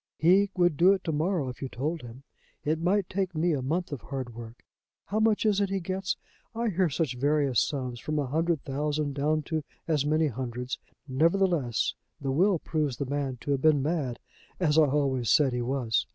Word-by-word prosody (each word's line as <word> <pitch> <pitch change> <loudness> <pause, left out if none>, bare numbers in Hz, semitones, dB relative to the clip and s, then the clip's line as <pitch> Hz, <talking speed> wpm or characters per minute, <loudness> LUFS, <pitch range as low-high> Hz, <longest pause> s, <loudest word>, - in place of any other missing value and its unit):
He 190 +5 +4
would 175 -5 +3
do 185 +3 +6
it 190 - -3
to 165 - -1
morrow 160 -1 0
if 125 - -9
you 135 - -3
told 150 +7 -3
him. 120 +3 -11 0.4
It 155 +2 0
might 185 +2 +2
take 190 -2 -2
me 170 +3 +2
a 140 - -1
month 165 +7 -1
of 145 - -5
hard 130 -3 -5
work. 115 +1 -10 0.4
How 215 - -1
much 220 0 +2
is 205 -2 +3
it 200 - +1
he 195 0 -1
gets? 185 +1 -2 0.4
I 230 0 0
hear 185 -2 +1
such 145 -4 -1
various 140 -3 +2
sums, 125 -4 -2
from 155 +4 -3
a 145 - +1
hundred 160 +3 0
thousand 145 +1 -1
down 150 +2 0
to 155 0 -2 0.2
as 155 -4 +2
many 155 +2 +2
hundreds. 125 -1 -4 0.3
Nevertheless, 160 - +2 0.3
the 135 -2 -2
will 180 +7 +3
proves 150 -5 -2
the 140 - -2
man 140 -1 -2
to 145 - -3
have 135 -2 +1
been 150 -3 +4
mad, 145 -6 -1 0.4
as 155 -5 +2
I 155 - +7
always 135 -4 0
said 145 -5 +4
he 125 - -1
was. 120 -2 0
150 Hz, 205 wpm, -28 LUFS, 135-175 Hz, 0.4 s, I